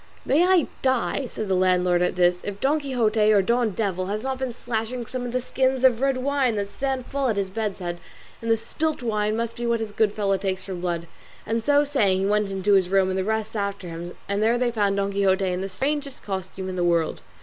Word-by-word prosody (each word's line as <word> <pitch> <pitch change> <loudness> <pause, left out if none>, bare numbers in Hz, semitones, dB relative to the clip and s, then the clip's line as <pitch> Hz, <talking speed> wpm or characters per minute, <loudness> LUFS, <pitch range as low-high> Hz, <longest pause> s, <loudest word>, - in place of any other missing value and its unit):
"May 295 +6 +4
I 370 -5 +4 0.2
die," 260 +1 0
said 215 -2 -5
the 190 - +1
landlord 180 -1 +3
at 180 - +1
this, 180 0 +3
"if 205 -1 -5
Don 290 +6 +2
Quixote 225 -6 +2
or 200 -2 +5
Don 235 +3 +2
Devil 185 -3 -2
has 210 +2 -3
not 265 0 -2
been 260 -2 -2
slashing 235 +1 -3
some 250 +1 -4
of - - -5
the 255 - 0
skins 260 +1 0
of 250 -2 +4
red 270 -1 +2
wine 265 -2 +1
that 200 -1 -2
stand 265 0 -2
full 275 -1 -1
at 220 -4 0
his 195 -1 -1
bed's 210 -1 -2
head, 175 -2 -5 0.4
and 230 - -4
the 225 - +4
spilt 305 +5 -2
wine 215 -1 0
must 230 0 -2
be 240 0 -3
what 235 0 +2
this 225 -2 -4
good 210 0 +2
fellow 200 -2 0
takes 190 -1 -2
for 190 - -6
blood;" 175 -2 -3 0.4
and 225 +1 -1
so 290 +3 +4
saying 210 -10 +2
he - - +1
went 210 0 +1
into 195 +1 0
the 180 - -8
room 190 -1 +3
and 185 - -1
the - - 0
rest 220 +2 -2
after 200 -3 -3
him, 170 +1 -6
and 200 +1 -1
there 230 +2 +3
they 245 -1 +1
found 205 -3 +1
Don 200 0 0
Quixote 195 -1 +2
in 180 0 -1
the 195 - -3
strangest 280 +7 -2
costume 190 -1 -5
in 185 - -4
the 175 - +1
world. 170 -2 +1
215 Hz, 245 wpm, -24 LUFS, 190-250 Hz, 0.4 s, or